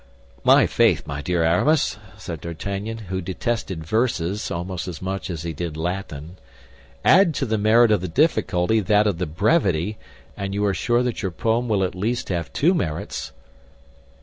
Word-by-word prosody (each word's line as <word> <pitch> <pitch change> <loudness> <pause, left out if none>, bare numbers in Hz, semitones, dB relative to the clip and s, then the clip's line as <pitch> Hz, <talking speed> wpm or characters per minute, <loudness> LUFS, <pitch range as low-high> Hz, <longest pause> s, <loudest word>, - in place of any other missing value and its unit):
"My - - +6
faith, - - +2
my 70 0 -5
dear 85 +1 0
Aramis," 105 - +2 0.2
said 85 -7 -7
D'Artagnan, 100 +7 -4 0.2
who 95 - -1
detested 95 -2 -3
verses 105 -2 0
almost 90 +2 -4
as 85 -4 -6
much 95 +1 -4
as 85 -3 -4
he 85 -1 -4
did 80 0 -5
Latin, 85 -1 -5 0.7
"add 170 -2 +5
to 135 - -1
the 110 -3 -1
merit 110 +2 +5
of 105 - +3
the 90 - -3
difficulty 110 - +2
that 105 +1 +3
of 100 -5 0
the 90 - -1
brevity, 95 - +1 0.4
and 100 -1 -4
you 105 0 +1
are 100 - +2
sure 120 +4 +1
that 125 -2 -2
your 95 - -1
poem 115 +5 -1
will 100 -3 +2
at 90 - -1
least 110 +7 -2
have 85 -3 -2
two 170 +6 +3
merits." 80 - -3
95 Hz, 175 wpm, -23 LUFS, 85-110 Hz, 0.7 s, My